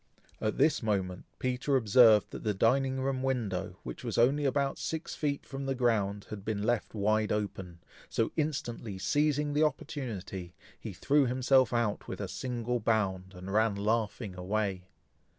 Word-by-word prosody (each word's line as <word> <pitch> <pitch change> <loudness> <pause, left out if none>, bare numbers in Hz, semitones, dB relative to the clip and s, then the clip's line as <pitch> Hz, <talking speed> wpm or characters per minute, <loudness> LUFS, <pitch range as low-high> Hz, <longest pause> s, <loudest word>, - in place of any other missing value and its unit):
At 110 - -1
this 145 +2 +3
moment, 95 -5 -1
Peter 130 +2 0
observed 110 -2 +6
that - - -7
the 105 -2 0
dining 130 +5 +2
room 130 -1 -1
window, 120 -9 -2
which - - -7
was - - -3
only 140 +5 +3
about 140 0 0
six 160 0 -4
feet 145 -2 -2
from 135 0 -6
the 135 - 0
ground, 105 -5 +1
had 105 -2 -6
been 105 -1 -2
left 120 -1 0
wide 110 +1 +1
open, 95 -5 -3 0.3
so 115 - 0
instantly 120 -9 -2
seizing 145 +6 +1
the 150 - +2
opportunity, 105 - -3 0.2
he - - -6
threw 145 -1 +2
himself 130 0 +3
out 120 -4 0
with - - -5
a - - -3
single 125 -1 -2
bound, 100 -4 0
and 90 +2 -7
ran 110 -1 +3
laughing 105 -1 -1
away. 95 0 -2
115 Hz, 160 wpm, -30 LUFS, 100-135 Hz, 0.3 s, observed